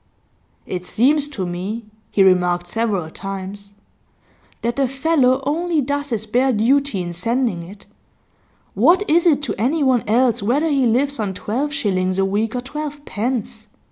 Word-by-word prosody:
'It 180 -1 -4
seems 280 +10 +2
to 225 -11 -4
me,' 190 +6 -4 0.2
he 195 - +3
remarked 180 -2 +3
several 200 -3 -1
times, 195 +2 -7 0.9
'that 235 +1 0
the 275 -1 +2
fellow 270 -1 +2
only 330 +3 0
does 285 +1 -2
his 220 -3 -2
bare 250 +5 +2
duty 240 -2 +2
in 175 0 -5
sending 230 +1 -1
it. 195 +4 -12 0.9
What 340 - +3
is 340 +3 +4
it 295 -3 +3
to 235 -8 -1
anyone 260 -1 +2
else 235 +1 +2
whether 275 +10 +1
he 270 -3 +3
lives 270 +4 +1
on 200 -3 -2
twelve 265 +11 -2
shillings 185 -9 0
a 195 - +2
week 210 +4 -1
or 250 - -1
twelve 290 +2 -6
pence? 220 -1 -3
235 Hz, 155 wpm, -20 LUFS, 200-280 Hz, 0.9 s, is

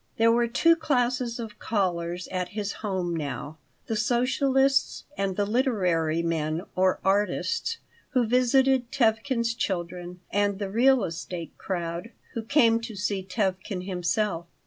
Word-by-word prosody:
There 230 0 +5
were 235 0 +3
two 330 +8 +4
classes 250 -6 0
of 220 -2 -7
callers 180 -4 -1
at 180 -1 -2
his 205 -1 -1
home 185 -5 -1
now: 145 0 -5 0.3
the 225 - -2
socialists 265 +4 +2
and 195 -1 -1
the 205 - +1
literary 180 - +1
men 160 0 -1
or 185 0 +2
artists 205 - +1 0.4
who 250 -3 +3
visited 255 +1 +3
Tevkin's 235 0 +1
children 180 -3 -4
and 205 0 +1
the 200 -1 -4
"real 250 +2 +4
estate 170 0 -5
crowd" 175 +2 -3 0.2
who 230 - -2
came 230 -1 +4
to 230 -2 -7
see 195 0 -1
Tevkin 185 -1 -2
himself. 180 -1 -1
205 Hz, 135 wpm, -26 LUFS, 180-240 Hz, 0.4 s, There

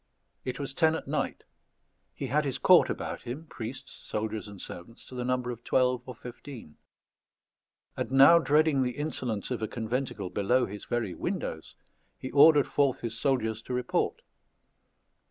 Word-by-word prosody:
It 130 - -4
was 140 -1 -3
ten 160 +1 +3
at - - -6
night; - - -2 0.7
he - - -4
had 145 +4 +1
his 135 -2 -2
court 180 +4 +6
about - - -4
him, 130 +7 -6
priests, 125 -3 -7
soldiers, 110 0 -3
and 100 -2 -11
servants, 100 +9 -9
to - - -12
the 125 -1 -3
number 125 0 -1
of 120 0 -9
twelve 125 -1 +2
or 125 - -7
fifteen; 120 - -10 1.2
and - - -3
now 135 +6 +8
dreading 150 -2 +3
the 125 0 -1
insolence 130 -8 -3
of 120 -3 -2
a 110 - -1
conventicle 110 -4 -3
below 125 +5 +2
his 105 0 -8
very 115 -6 -2
windows, 80 - -4 0.4
he 130 - -7
ordered 145 0 +7
forth 140 -3 +1
his 115 -1 -4
soldiers 110 -5 0
to 125 - -4
report. 125 0 -1
125 Hz, 160 wpm, -29 LUFS, 110-140 Hz, 1.2 s, now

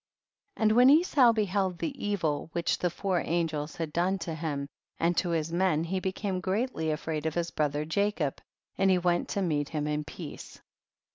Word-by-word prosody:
39. - - -2
And 215 0 +4
when 250 +2 +7
Esau 290 -5 +6
beheld 200 -4 0
the 275 - -4
evil* 165 -7 -1
which 170 -1 0
the 180 - +1
four 180 +1 -1
angels 160 -3 -1
had 160 -3 -4
done 180 +3 +1
to 170 -2 -5
him 150 -3 -3 0.3
and 170 +1 +1
to 175 - +1
his 165 -1 -1
men, 175 -3 +2
he 185 +3 -2
became 190 0 -2
greatly 190 -2 -1
afraid 155 0 -2
of 160 - -3
his 170 -1 -1
brother 150 0 -1
Jacob, 170 -4 -1 0.4
and 195 - +4
he 185 - +5
went 175 -1 +1
to 200 - -1
meet 150 -4 0
him 150 -2 -2
in 150 0 -1
peace. 150 +1 -9
170 Hz, 190 wpm, -29 LUFS, 155-195 Hz, 0.4 s, when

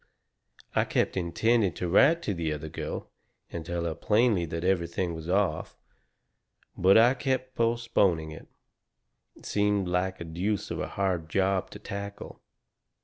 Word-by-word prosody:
I - - +4
kept - - 0
intending 95 +3 +1
to 90 - -3
write 150 - +4
to 105 - -1
the 85 -3 -2
other 75 +1 -6
girl - - -6 0.4
and 85 - -5
tell 85 +1 -3
her 85 - -1
plainly 105 0 +2
that 85 +1 -4
everything 90 -1 0
was 80 +1 -7
off. 95 -4 0 1.0
But 95 +3 +5
I 120 +3 +6
kept 130 -1 -2
postponing 115 -9 +1
it. 80 - -11 0.9
It - - -17
seemed 105 -2 +1
like 90 +1 -1
a - - -5
deuce 100 +6 -2
of - - -3
a - - -2
hard 90 -5 -2
job 95 +1 +1
to - - -9
tackle. 100 -1 -7
95 Hz, 150 wpm, -28 LUFS, 85-105 Hz, 1.0 s, I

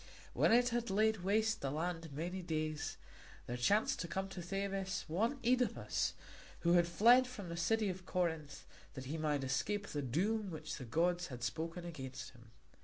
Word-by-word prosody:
When - - +4
it 245 +1 +5
had 235 -1 -1
laid 220 +3 +3
waste 210 +4 +1
the 135 - -1
land 165 +2 -3
many 175 +6 -3
days, 155 -3 -2 0.5
there 120 - -3
chanced 200 - +2
to 170 - -2
come 190 +2 -3
to 185 - -6
Thebes 195 +1 -2
one 220 - +1
Œdipus, 250 +1 +1 0.5
who 170 0 +4
had 175 -1 +5
fled 235 +9 +6
from 205 -8 -7
the 170 - -4
city 210 +6 +2
of 185 -1 -5
Corinth 160 -5 -2 0.3
that 130 -1 -6
he 155 +5 -3
might 150 -3 0
escape 195 +11 0
the 150 -6 -3
doom 195 - 0
which 155 -2 -5
the 130 - -7
gods 175 +7 +1
had 125 -2 -7
spoken 165 +5 -3
against 135 -6 -6
him. 120 -2 -17
175 Hz, 180 wpm, -36 LUFS, 155-205 Hz, 0.5 s, fled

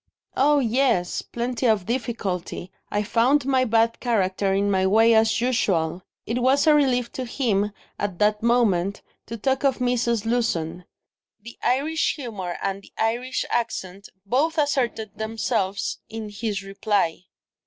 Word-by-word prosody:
"Oh, 290 +2 +4
yes, 240 -7 +1
plenty 240 +1 -2
of 215 -5 +2
difficulty; 200 -7 -3 0.2
I 205 0 0
found 250 +6 +2
my 260 -1 +2
bad 230 0 +2
character 195 -4 0
in 200 +1 +1
my 190 -1 +2
way, 225 +4 +5
as 220 -1 +3
usual." 190 -9 0 0.2
It 240 +3 -2
was 265 +4 +3
a 310 - +6
relief 255 -5 +2
to 260 - -4
him, 215 -5 0 0.3
at 200 -4 -2
that 210 +1 +2
moment, 205 -5 +2 0.2
to 230 - -5
talk 265 +5 0
of 270 -3 +2
Mrs. 240 -3 0
Lewson; 180 -8 -1 0.5
the 235 +3 -11
Irish 305 +6 +1
humour 205 - -5
and 195 0 -2
the - - -19
Irish 240 +4 -1
accent 200 -5 -3 0.2
both 285 +10 +1
asserted 250 -8 -1
themselves 220 -3 -1
in 220 -1 -6
his 205 -1 -3
reply. 195 -3 -1
225 Hz, 145 wpm, -24 LUFS, 200-250 Hz, 0.5 s, a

